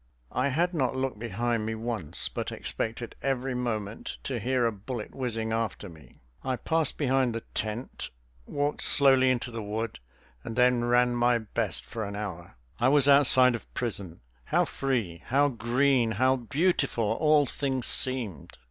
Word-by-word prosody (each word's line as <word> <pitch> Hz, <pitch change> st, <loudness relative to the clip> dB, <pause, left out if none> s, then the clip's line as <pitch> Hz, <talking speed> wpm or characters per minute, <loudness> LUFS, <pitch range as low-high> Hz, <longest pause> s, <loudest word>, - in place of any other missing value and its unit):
I 130 Hz, +2 st, 0 dB
had 170 Hz, +6 st, 0 dB
not 130 Hz, -5 st, 0 dB
looked 130 Hz, -4 st, -2 dB
behind 115 Hz, +1 st, -1 dB
me 110 Hz, -, -2 dB
once, 110 Hz, -8 st, -3 dB
but -, -, -4 dB
expected 115 Hz, +1 st, -4 dB
every 135 Hz, -1 st, -1 dB
moment 110 Hz, -4 st, -4 dB
to 130 Hz, -3 st, -3 dB
hear 125 Hz, +2 st, +1 dB
a 115 Hz, -, +2 dB
bullet 110 Hz, +2 st, -7 dB
whizzing 115 Hz, -4 st, -2 dB
after 115 Hz, -3 st, -3 dB
me. 80 Hz, -3 st, -17 dB, 0.2 s
I 130 Hz, -1 st, -1 dB
passed 160 Hz, +5 st, 0 dB
behind 130 Hz, -4 st, +1 dB
the 115 Hz, -, -3 dB
tent, 110 Hz, +4 st, -4 dB, 0.4 s
walked 145 Hz, +1 st, -1 dB
slowly 135 Hz, -2 st, +4 dB
into 125 Hz, -1 st, -1 dB
the 115 Hz, -1 st, -5 dB
wood, 110 Hz, -, -4 dB, 0.4 s
and 115 Hz, -, -6 dB
then 125 Hz, -1 st, +3 dB
ran 120 Hz, 0 st, +3 dB
my 120 Hz, 0 st, +3 dB
best 110 Hz, -2 st, -3 dB
for 115 Hz, -, -5 dB
an 100 Hz, 0 st, -5 dB
hour. 90 Hz, -8 st, -6 dB, 0.2 s
I 120 Hz, -, +3 dB
was 140 Hz, -1 st, +4 dB
outside 130 Hz, -3 st, +7 dB
of 115 Hz, -, -7 dB
prison. 100 Hz, -, -3 dB, 0.2 s
How -, -, +2 dB
free, 115 Hz, -12 st, -2 dB
how 140 Hz, +3 st, +3 dB
green, 120 Hz, -1 st, +1 dB
how 130 Hz, +4 st, +3 dB
beautiful 135 Hz, 0 st, 0 dB
all 150 Hz, +7 st, +3 dB
things 130 Hz, -1 st, -2 dB
seemed! 120 Hz, -, 0 dB
120 Hz, 160 wpm, -28 LUFS, 110-135 Hz, 0.4 s, outside